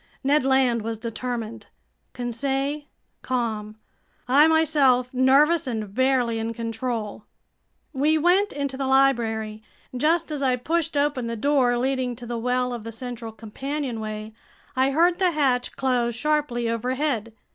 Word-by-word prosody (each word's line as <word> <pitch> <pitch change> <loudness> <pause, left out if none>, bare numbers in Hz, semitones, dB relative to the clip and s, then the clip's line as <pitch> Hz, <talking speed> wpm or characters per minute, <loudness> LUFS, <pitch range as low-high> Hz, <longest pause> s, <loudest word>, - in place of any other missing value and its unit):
Ned 285 +1 +3
Land 260 -3 +3
was 225 +1 -4
determined, 230 0 -5 0.5
Conseil 270 +4 -2 0.4
calm, 220 -4 -3 0.5
I 285 +5 +6
myself 280 -6 +3
nervous 275 +5 +4
and 215 -5 -4
barely 255 -2 +1
in 225 +1 -3
control. 225 -2 -4 0.7
We 300 +3 +2
went 365 +6 +3
into 280 -2 -3
the 270 -1 -2
library. 230 -5 +1 0.3
Just 320 +5 +1
as 295 -2 -3
I 260 -2 +2
pushed 325 +4 -1
open 285 -4 0
the 230 - -3
door 250 0 +2
leading 255 -1 -1
to 240 +1 -10
the 240 0 -4
well 250 +1 0
of 235 -3 -6
the 230 - -6
central 235 -1 -6
companionway, 220 -2 -5 0.4
I 260 +1 +3
heard 340 +5 +3
the 370 -2 +4
hatch 260 -5 +1
close 245 -3 0
sharply 280 -3 0
overhead. 240 0 -1
255 Hz, 135 wpm, -24 LUFS, 230-280 Hz, 0.7 s, I